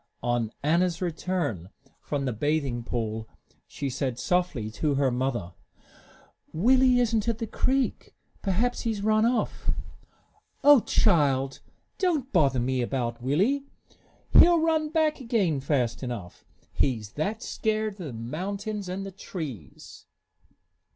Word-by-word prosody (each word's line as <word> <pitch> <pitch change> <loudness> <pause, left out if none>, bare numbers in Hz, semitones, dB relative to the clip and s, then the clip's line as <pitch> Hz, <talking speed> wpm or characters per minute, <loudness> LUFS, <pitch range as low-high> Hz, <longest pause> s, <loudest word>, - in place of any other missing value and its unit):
On 120 -2 0
Anna's 170 +3 +2
return 165 - -2 0.3
from 140 -2 -2
the 125 - -1
bathing 135 -1 -1
pool 110 -2 -3 0.4
she 140 - -4
said 130 -2 -2
softly 145 -6 0
to 145 +5 0
her 135 -1 +2
mother, 120 -8 -2 1.0
"Willie 255 +7 +4
isn't 230 -2 +1
at 230 - 0
the 230 - -3
creek. 265 +4 -1 0.3
Perhaps 225 +5 0
he 230 - -1
has 200 -2 -5
run 215 +1 +3
off." 245 0 -1 0.9
"O 290 -1 +8
child, 140 -12 +2 0.4
don't 315 -9 0
bother 140 -8 +3
me 130 +1 0
about 120 -1 -2
Willie! 205 - +1 0.6
He'll 345 0 +7
run 315 -1 +1
back 310 -2 +1
again 205 - +1
fast 130 -4 0
enough, 120 -9 -6 0.3
he's 110 -6 0
that 205 - -3
scared 215 -2 -2
of 180 - -5
the - - -6
mountains 190 - -4
and 190 +2 -4
the 195 - -6
trees." 155 - -8
165 Hz, 130 wpm, -27 LUFS, -, 1.0 s, O